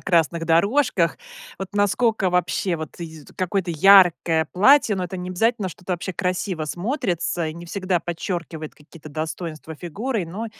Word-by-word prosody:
красных 170 -2 +1
дорожках 200 - +2 0.4
вот 195 - -5
насколько 205 0 +2
вообще 180 0 0
вот 155 0 -8
й 160 -3 -8
какое-то 185 -1 -1
яркое 170 -2 +5
платье, 220 +2 +5
но 185 - -2
это 180 +1 -6
необязательно 190 +4 0
что 180 - -12
это 185 - -2
вообще 180 +2 -3
красиво 180 -2 -2
смотрится, 175 - -2
и 155 - -6
не 170 +1 -10
всегда 185 -1 -1
подчеркивает 170 -2 -5
какие-то 155 +1 -14
достоинства 160 +1 -5
фигуры. 200 - -3
Но 200 +8 -5
180 Hz, 145 wpm, -23 LUFS, 165-200 Hz, 0.4 s, яркое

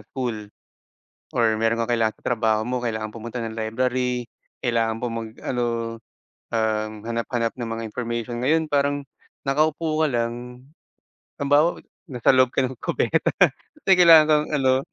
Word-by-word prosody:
school. 115 -6 -4 0.8
Or 110 -2 +2
meron 115 +1 +1
kang 120 +1 +1
kailangan 110 -1 0
sa - - -15
trabaho 110 -2 +1
mo 125 -1 -2
kailangan 110 -2 -2
pumunta 115 +2 -6
ng 115 0 -5
library, 125 +2 -1 0.3
kailangan 115 -2 0
po 125 - -2
mag 115 -1 -5
ano, 125 -2 -1 0.9
um, 110 -2 0 0.2
hanap-hanap 115 0 -2
ng 120 -2 -5
mga 115 0 -4
information. 120 +1 -4
Ngayon 160 +4 +2
parang, 145 -1 0 0.4
nakaupo 155 +2 +1
ka - - +4
lang, 120 +1 -4 0.7
halimbawa 145 +4 +2 0.2
nasa 125 -5 +2
loob 130 -1 +4
ka - - +3
ng 130 - -8
kubeta - - +1 0.5
kasi - - -4
kailangan 165 -3 +8
kang 150 0 +3
ano, 130 -2 +3
120 Hz, 145 wpm, -23 LUFS, 115-135 Hz, 0.9 s, kailangan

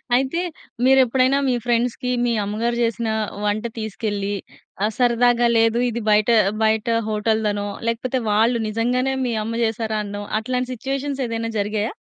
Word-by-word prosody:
అయితే 270 +7 +1 0.4
మీరెప్పుడైనా 260 0 +4
మీ - - +2
ఫ్రెండ్స్‌కి, 245 +1 0
మీ 240 - +1
అమ్మగారు 230 +4 -1
చేసిన 230 0 -1 0.4
వంట 210 +2 0
తీసుకెళ్ళి 205 -2 -3 0.5
ఆ! 210 - +3
సరదాగా 240 -1 +3
లేదు 225 +1 +3
ఇది 235 0 -3
బయట, 210 +2 +3 0.3
బయట 220 +1 +2 0.2
హోటల్‌ధనో 210 -1 0 0.2
లేకపోతే 245 +3 -1
వాళ్ళు 225 +3 +3
నిజంగానే 250 +4 0
మీ 240 - -1
అమ్మ 230 +1 -4
చేసారనో 215 -2 -3 0.2
అట్లాంటి 250 +2 -2
సిట్యుయేషన్స్ 275 +2 -3
ఏదైనా 230 0 -3
జరిగాయా? 210 +3 -1
230 Hz, 130 wpm, -22 LUFS, 215-250 Hz, 0.5 s, మీరెప్పుడైనా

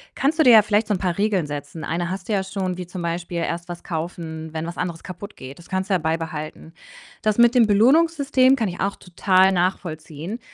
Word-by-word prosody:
kannst 305 +4 0
du - - +6
dir 250 - +7
ja 220 - +9
vielleicht 210 +1 +1
so 210 - +1
'n 185 - -2
paar 180 -2 -1
Regeln 200 -5 +1
setzen. 145 +2 -7
Eine 170 +1 -2
hast 190 +2 -6
du - - +1
ja 195 - +2
schon, 190 -2 -3
wie 180 -1 -6
zum 180 -1 -7
Beispiel: 170 0 -3
„Erst 170 +1 -3
was 175 0 -8
kaufen, 160 -2 -5
wenn 160 +1 -3
was 170 - -7
anderes 170 -2 -4
kaputt 195 +3 -9
geht.“ 130 +4 -10
Das 170 - -15
kannst 190 +1 -2
du 190 - +3
ja - - +4
beibehalten. 160 0 -4 0.5
Das 215 0 +1
mit 240 +1 +6
dem 235 -3 +5
Belohnungssystem 270 +3 +4
kann 225 -6 -1
ich 175 - -8
auch 200 +1 -1
total 185 +1 +2
nachvollziehen. 175 +1 -3
180 Hz, 230 wpm, -22 LUFS, 165-210 Hz, 0.5 s, ja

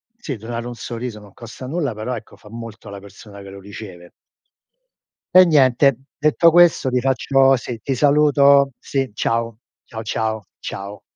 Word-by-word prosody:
sì, 165 - -6
donare 115 +2 -6
un 120 - -7
sorriso 115 -2 -6
non 105 -2 -16
costa 120 +2 -10
nulla, 140 -4 -3
però 115 +4 -4
ecco 115 - -11
fa 105 - -17
molto 115 -2 -10
alla 100 0 -8
persona 100 +1 -14
che 100 - -11
lo 100 0 -11
riceve. 95 -3 -11 1.2
E 185 0 +9
niente. 140 -4 +4 0.2
Detto 155 +3 +4
questo, 175 -5 +4
ti 125 0 +1
faccio 135 +1 +3
sì. 120 -1 -6
Ti 135 - -1
saluto. 140 0 +4
Sì. 135 -2 -2
Ciao. 115 +1 -2 0.3
Ciao, 110 - -8
ciao. 110 -1 -3 0.2
Ciao. 100 +1 -7
120 Hz, 160 wpm, -20 LUFS, 110-140 Hz, 1.2 s, E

